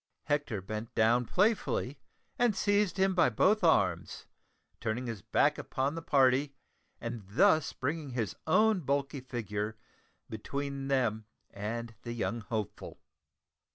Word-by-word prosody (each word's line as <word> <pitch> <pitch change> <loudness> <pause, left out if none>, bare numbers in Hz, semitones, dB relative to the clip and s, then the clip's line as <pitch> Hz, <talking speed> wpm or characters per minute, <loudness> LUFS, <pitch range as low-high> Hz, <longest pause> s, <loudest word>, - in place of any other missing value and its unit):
Hector 145 -9 -1
bent 110 +3 -6
down 115 +2 +3
playfully 180 - 0 0.4
and 240 -4 +3
seized 205 -2 +1
him 190 0 +3
by 175 -8 +4
both 190 - +3
arms, 95 - +2 0.5
turning 115 +3 -2
his 115 -5 -5
back - - +2
upon 135 +2 -1
the 165 - -5
party, 140 -1 +3 0.4
and 115 -1 -5
thus 155 - +3
bringing 150 +2 -3
his 115 -6 -2
own 215 +5 +4
bulky 140 -1 -1
figure 110 -4 -4 0.5
between 140 +5 -4
them 115 -6 0 0.3
and 115 +3 -4
young 120 0 -2
Hopeful. 110 -1 -5
130 Hz, 120 wpm, -31 LUFS, 110-155 Hz, 0.5 s, by